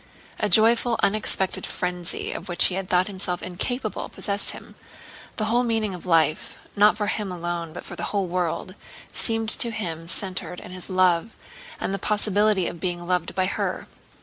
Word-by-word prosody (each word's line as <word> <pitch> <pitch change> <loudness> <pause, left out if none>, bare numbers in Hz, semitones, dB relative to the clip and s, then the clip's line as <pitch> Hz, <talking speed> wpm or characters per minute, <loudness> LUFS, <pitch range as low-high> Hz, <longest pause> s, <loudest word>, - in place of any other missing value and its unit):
A 210 - +1
joyful, 230 +4 +5
unexpected 195 -2 +3
frenzy, 180 -1 -3
of 180 +3 -6
which 175 - +3
he - - +2
had 190 0 -4
thought 180 0 +3
himself 185 -3 -2
incapable, 215 +5 -3
possessed 200 0 +2
him. - - -5 0.6
The 215 - -1
whole 235 +3 +2
meaning 225 -4 0
of 180 0 -9
life—not 170 +5 +2
for 210 - -1
him 205 -1 -2
alone 175 -2 -4
but - - -8
for - - -8
the - - -4
whole 200 -2 -1
world—seemed 185 +5 -3
to 235 - +2
him 165 -7 -5
centered 185 -1 0
in - - -10
his 185 +1 -7
love 185 +2 +2 0.4
and 195 - -2
the 195 - -2
possibility 210 -1 +2
of 170 - -5
being 175 -1 -2
loved 180 -1 -1
by 185 - +2
her. 190 - -2
185 Hz, 170 wpm, -24 LUFS, 180-210 Hz, 0.6 s, joyful